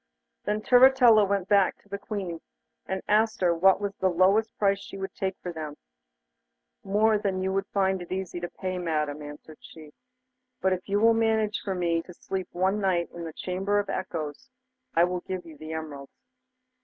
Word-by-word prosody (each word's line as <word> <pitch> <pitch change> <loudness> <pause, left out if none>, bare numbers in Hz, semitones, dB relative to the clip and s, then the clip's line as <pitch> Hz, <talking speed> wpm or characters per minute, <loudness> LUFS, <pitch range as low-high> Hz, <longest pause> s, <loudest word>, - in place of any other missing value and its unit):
Then 210 +1 -1
Turritella 245 -4 +6
went 200 -2 0
back 200 -2 +3
to - - -26
the 200 0 -5
Queen, 190 -6 -5 0.5
and 190 0 -3
asked 220 +1 +2
her 175 -2 +4
what 190 +3 +4
was 200 -1 -3
the 190 - +2
lowest 195 +5 +2
price 200 -1 +2
she 195 - -9
would 195 0 -5
take 190 -1 -3
for 175 - -4
them. 155 -2 -6 1.1
'More 210 +2 +3
than 190 -2 -1
you 190 0 -1
would 195 0 -1
find 190 -2 0
it 175 - -10
easy 185 -2 -3
to 175 0 -5
pay, 185 -1 -4
Madam,' 150 -3 -2
answered 150 +1 -11
she; 155 -2 -13 0.7
'but 190 +1 +2
if 185 +1 -6
you 200 +1 +2
will 230 +1 +5
manage 220 -1 +1
for 195 -2 -2
me 170 -2 0
to 175 +1 -13
sleep 190 0 -4
one 190 +4 0
night 180 -3 0
in 170 -1 -6
the 160 - -7
Chamber 190 +4 -1
of 205 -1 -1
Echoes, 160 -6 -5 0.5
I 165 - +5
will 180 0 0
give 185 -1 -5
you 160 -2 -11
the 155 +2 -8
emeralds. 145 -3 -7
190 Hz, 195 wpm, -27 LUFS, 170-205 Hz, 1.1 s, Turritella